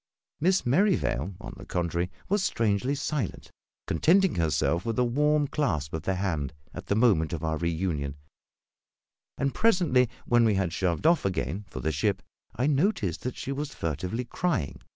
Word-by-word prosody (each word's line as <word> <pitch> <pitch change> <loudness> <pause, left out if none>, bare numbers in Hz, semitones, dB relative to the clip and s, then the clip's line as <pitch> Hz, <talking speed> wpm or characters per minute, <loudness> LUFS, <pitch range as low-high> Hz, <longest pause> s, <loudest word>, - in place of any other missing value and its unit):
Miss 185 +4 +2
Merrivale, 120 - +1
on - - -8
the - - -10
contrary, 85 0 -1 0.2
was 205 +1 +1
strangely 115 - +1
silent, 145 - -3 0.3
contenting 190 +2 +3
herself 85 +1 +1
with 115 -1 -2
a 125 - +4
warm 150 +5 +2
clasp 80 - -1
of 80 - -2
the 95 +4 -1
hand 80 -7 -2 0.2
at 90 +1 -8
the 100 - +1
moment 100 -9 +3
of 80 -1 -4
our 80 -1 0
reunion; 80 -4 -1 1.2
and 140 -1 0
presently, 170 - +3 0.2
when 120 -1 +4
we 110 -3 +3
had 95 -3 0
shoved 90 - -1
off 165 0 +4
again 95 +1 -2
for - - -6
the 80 - 0
ship, 75 - 0 0.3
I 125 - 0
noticed 140 - +1
that 125 - -4
she 135 - -4
was 140 +1 -4
furtively 90 - -3
crying. 140 - -2
105 Hz, 165 wpm, -27 LUFS, -, 1.2 s, a